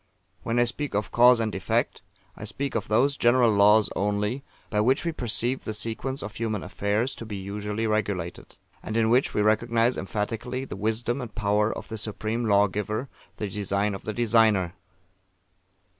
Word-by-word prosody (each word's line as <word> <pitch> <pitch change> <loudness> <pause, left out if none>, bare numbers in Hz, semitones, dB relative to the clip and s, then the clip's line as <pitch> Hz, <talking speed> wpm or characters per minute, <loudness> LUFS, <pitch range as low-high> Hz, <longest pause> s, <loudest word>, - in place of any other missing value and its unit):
When 115 +1 -2
I 120 - +5
speak 130 +1 -3
of 105 +1 -1
Cause 125 0 +6
and 110 -2 -1
Effect, 95 - -1 0.3
I - - -10
speak 140 -1 -4
of 110 - -2
those 130 +6 +3
general 120 -1 +4
laws 105 +1 +5
only, 105 +6 -1 0.3
by 105 -2 +2
which 130 +9 +2
we 170 - +1
perceive 125 -2 -2
the 110 - -4
sequence 115 +5 -3
of 105 - -6
human 110 -3 -2
affairs 105 +6 -1
to - - -8
be 110 -2 -6
usually 105 +3 -4
regulated; 100 -5 -2 0.3
and 110 - -3
in 115 0 +3
which 125 +3 +2
we 105 - +2
recognise 115 +3 +2
emphatically 115 +6 -3
the - - -7
wisdom 110 +5 -1
and 115 -4 -8
power 105 +1 +1
of - - -7
the 110 - -5
Supreme 110 +2 -3
Lawgiver, 105 +4 +1 0.3
the 105 - -3
design 100 +1 -1
of 100 - -6
The 110 - -4
Designer. 110 -6 +3
110 Hz, 175 wpm, -26 LUFS, 105-120 Hz, 0.3 s, Cause